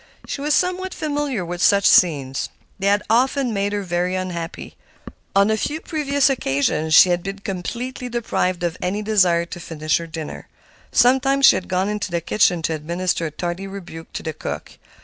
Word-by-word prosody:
She 275 Hz, -, -5 dB
was 295 Hz, +1 st, +2 dB
somewhat 365 Hz, +1 st, -1 dB
familiar 290 Hz, -, -2 dB
with 175 Hz, +1 st, -5 dB
such 200 Hz, +1 st, +4 dB
scenes. 140 Hz, -7 st, +3 dB, 0.3 s
They 195 Hz, -, 0 dB
had 205 Hz, +1 st, +3 dB
often 250 Hz, +2 st, +2 dB
made 200 Hz, 0 st, -1 dB
her 205 Hz, -1 st, -2 dB
very 180 Hz, 0 st, -1 dB
unhappy. 175 Hz, -3 st, -5 dB, 0.6 s
On 200 Hz, +2 st, +4 dB
a -, -, +3 dB
few 295 Hz, +8 st, -2 dB
previous 285 Hz, -4 st, +1 dB
occasions 155 Hz, -, +1 dB
she 185 Hz, -, +8 dB
had 175 Hz, 0 st, +1 dB
been 195 Hz, +2 st, -5 dB
completely 235 Hz, +7 st, -5 dB
deprived 185 Hz, -6 st, -1 dB
of 170 Hz, -1 st, -1 dB
any 195 Hz, +4 st, -2 dB
desire 185 Hz, -5 st, +3 dB
to 175 Hz, -, -8 dB
finish 155 Hz, -2 st, -1 dB
her 170 Hz, -, -7 dB
dinner. 160 Hz, -1 st, -7 dB, 0.4 s
Sometimes 265 Hz, +3 st, +4 dB
she -, -, +8 dB
had 185 Hz, -, -4 dB
gone 185 Hz, +1 st, 0 dB
into 210 Hz, -2 st, -2 dB
the 170 Hz, -1 st, -1 dB
kitchen 175 Hz, -1 st, +2 dB
to 160 Hz, -, 0 dB
administer 170 Hz, +2 st, -2 dB
a -, -, -7 dB
tardy 175 Hz, +5 st, -4 dB
rebuke 175 Hz, -4 st, -9 dB
to -, -, -5 dB
the 160 Hz, -, -3 dB
cook. -, -, -7 dB
190 Hz, 185 wpm, -21 LUFS, 170-240 Hz, 0.6 s, she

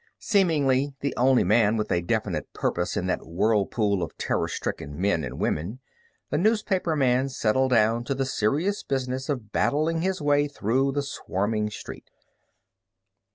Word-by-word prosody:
Seemingly 145 Hz, -, +2 dB
the 140 Hz, -2 st, -1 dB
only 130 Hz, 0 st, +4 dB
man 110 Hz, +2 st, +3 dB
with 105 Hz, -, -2 dB
a 85 Hz, -, +2 dB
definite 100 Hz, -4 st, -2 dB
purpose 90 Hz, +4 st, -1 dB
in 95 Hz, -, -1 dB
that 90 Hz, -, -1 dB
whirlpool 100 Hz, +2 st, +1 dB
of 85 Hz, -, -5 dB
terror -, -, -1 dB
stricken 75 Hz, +2 st, -5 dB
men 95 Hz, -4 st, +1 dB
and 65 Hz, -2 st, -5 dB
women, 90 Hz, +12 st, -2 dB, 0.5 s
the -, -, +1 dB
newspaperman 165 Hz, -, +1 dB
settled 130 Hz, +1 st, +1 dB
down 115 Hz, -1 st, +3 dB
to 135 Hz, -, -1 dB
the 135 Hz, 0 st, -1 dB
serious 145 Hz, -, 0 dB
business 130 Hz, 0 st, -3 dB
of 120 Hz, -7 st, -3 dB
battling 160 Hz, +3 st, +1 dB
his 190 Hz, +1 st, -1 dB
way 145 Hz, -1 st, +2 dB
through 135 Hz, +1 st, 0 dB
the 145 Hz, 0 st, -1 dB
swarming 105 Hz, -5 st, -2 dB
street. 105 Hz, -, -9 dB
125 Hz, 150 wpm, -26 LUFS, 105-145 Hz, 0.5 s, only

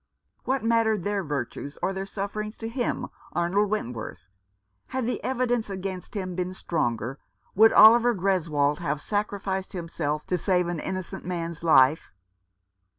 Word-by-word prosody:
What 265 Hz, -1 st, 0 dB
mattered 225 Hz, -4 st, +2 dB
their 205 Hz, 0 st, -1 dB
virtues 145 Hz, -1 st, -4 dB
or 195 Hz, -, +1 dB
their 195 Hz, 0 st, -4 dB
sufferings 210 Hz, +2 st, -4 dB
to 225 Hz, -, -5 dB
him, 240 Hz, +1 st, -2 dB, 0.2 s
Arnold 190 Hz, +4 st, +1 dB
Wentworth? 115 Hz, -, -4 dB, 0.6 s
Had 260 Hz, -2 st, -2 dB
the 250 Hz, -, -2 dB
evidence 245 Hz, -3 st, 0 dB
against 190 Hz, 0 st, -6 dB
him 185 Hz, -3 st, -3 dB
been 180 Hz, +1 st, -3 dB
stronger, 120 Hz, -, -2 dB, 0.3 s
would 220 Hz, +3 st, +7 dB
Oliver 235 Hz, +2 st, +7 dB
Greswold 165 Hz, -7 st, +1 dB
have 150 Hz, -3 st, -2 dB
sacrificed 200 Hz, 0 st, -2 dB
himself 155 Hz, -4 st, -3 dB
to 180 Hz, -, -1 dB
save 180 Hz, -3 st, +1 dB
an 175 Hz, -2 st, -3 dB
innocent 185 Hz, +2 st, -5 dB
man's 170 Hz, -2 st, -4 dB
life 145 Hz, -2 st, +4 dB
190 Hz, 140 wpm, -26 LUFS, 165-215 Hz, 0.6 s, would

